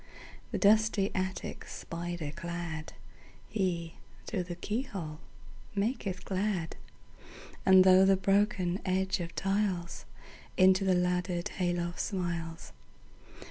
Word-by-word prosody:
The - - -2
dusty 215 -1 +4
attic 185 0 -3
spider 170 -3 -5
cladHe, 170 +1 -5 0.3
through 185 -5 -2
the 175 -1 -5
keyhole, 190 - -4 0.6
maketh 200 -2 -2
glad; 190 -3 -1 0.9
And 190 -1 +8
through 185 0 +7
the 195 0 +5
broken 195 -2 +2
edge 190 +1 0
of 170 -1 -5
tiles, 195 -3 -1 0.5
Into 190 +1 +6
the 190 -1 +3
laddered 180 0 0
hay 180 -1 -1
loft 175 0 -3
smiles. 170 - -3
185 Hz, 100 wpm, -31 LUFS, 175-195 Hz, 0.9 s, And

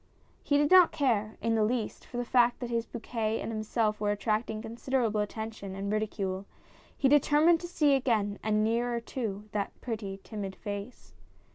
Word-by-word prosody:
He 285 - +2
did 290 0 +2
not 365 -2 +8
care, 220 -6 0
in 230 - +2
the 220 -1 +3
least, 225 0 -2
for 245 - -7
the 245 - -1
fact 240 0 +3
that 245 -1 -5
his 230 -1 -1
bouquet 225 -2 -2
and - - -4
himself 215 -1 -1
were 205 - +1
attracting 215 +1 -1
considerable 230 -1 -1
attention 210 -2 -5
and 200 +1 -3
ridicule; 200 -3 -2 0.5
he 275 - +3
determined 295 +4 +5
to 345 - -6
see 300 -5 +3
again, 220 -7 +1
and 215 0 +1
nearer 235 +2 +1
too, 215 -4 -5
that 205 -1 -3
pretty 210 -5 -5
timid 200 -3 -6
face. 205 +3 -7
225 Hz, 170 wpm, -29 LUFS, 210-245 Hz, 0.5 s, not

